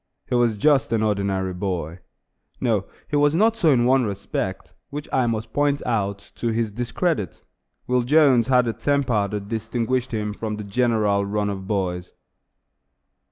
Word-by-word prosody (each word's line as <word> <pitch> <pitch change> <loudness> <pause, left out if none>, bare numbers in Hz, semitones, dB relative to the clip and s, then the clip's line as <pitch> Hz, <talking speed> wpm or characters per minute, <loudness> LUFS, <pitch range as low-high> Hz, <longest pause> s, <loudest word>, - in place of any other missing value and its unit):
He - - -4
was 120 -3 +2
just 140 +3 +3
an 110 -1 +2
ordinary 100 -3 0
boy. 90 -3 -3 0.6
No, 110 -6 0 0.2
he 150 - -3
was 145 +1 +3
not 220 +5 +3
so 170 -8 +2
in 120 -4 +4
one 130 +1 +4
respect, 100 -2 -4 0.2
which 145 +1 -6
I 130 -2 +2
must 110 -1 -3
point 145 -1 +1
out, 100 -3 -2
to 120 - -2
his 115 -1 0
discredit. 120 - -2 0.4
Will 125 0 +2
Jones 130 -2 +4
had 125 -2 +3
a 115 - 0
temper 130 -8 +1
that 100 0 -5
distinguished 115 +3 -2
him 105 -2 -2
from 110 0 -4
the 105 - -6
general 105 -2 +1
run 105 0 -1
of 95 -1 -6
boys. 90 -3 -2
115 Hz, 160 wpm, -23 LUFS, 100-130 Hz, 0.6 s, in